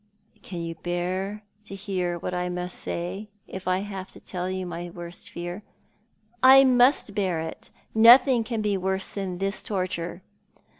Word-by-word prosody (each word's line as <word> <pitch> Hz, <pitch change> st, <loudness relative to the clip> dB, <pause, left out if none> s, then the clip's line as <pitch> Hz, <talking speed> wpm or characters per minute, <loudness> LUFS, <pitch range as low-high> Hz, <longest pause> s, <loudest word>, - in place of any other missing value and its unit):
" 215 Hz, -, -34 dB
Can 175 Hz, -4 st, -6 dB
you 165 Hz, 0 st, -4 dB
bear 180 Hz, +5 st, -3 dB, 0.2 s
to 195 Hz, -, -8 dB
hear 185 Hz, -3 st, -2 dB
wnat 180 Hz, -, -4 dB
I 180 Hz, 0 st, -1 dB
must 180 Hz, 0 st, -3 dB
say, 190 Hz, +5 st, -4 dB, 0.2 s
if 190 Hz, -1 st, -8 dB
I 185 Hz, +1 st, +2 dB
have 195 Hz, -2 st, -6 dB
to -, -, -12 dB
tell 180 Hz, 0 st, -4 dB
you 185 Hz, 0 st, -3 dB
my 175 Hz, 0 st, -5 dB
worst 175 Hz, 0 st, -9 dB
fear?" 175 Hz, +3 st, -6 dB, 0.4 s
" 225 Hz, +1 st, -39 dB, 0.2 s
I 270 Hz, -, +9 dB
must 250 Hz, -3 st, +4 dB
bear 190 Hz, -5 st, 0 dB
it. 160 Hz, 0 st, -6 dB, 0.2 s
Nothing 240 Hz, +2 st, +7 dB
can 225 Hz, -1 st, -3 dB
be 205 Hz, -2 st, +1 dB
worse 190 Hz, +1 st, -2 dB
than 190 Hz, -3 st, -4 dB
this 195 Hz, +2 st, -2 dB
torture." 185 Hz, -2 st, -3 dB
190 Hz, 170 wpm, -26 LUFS, 175-210 Hz, 0.4 s, I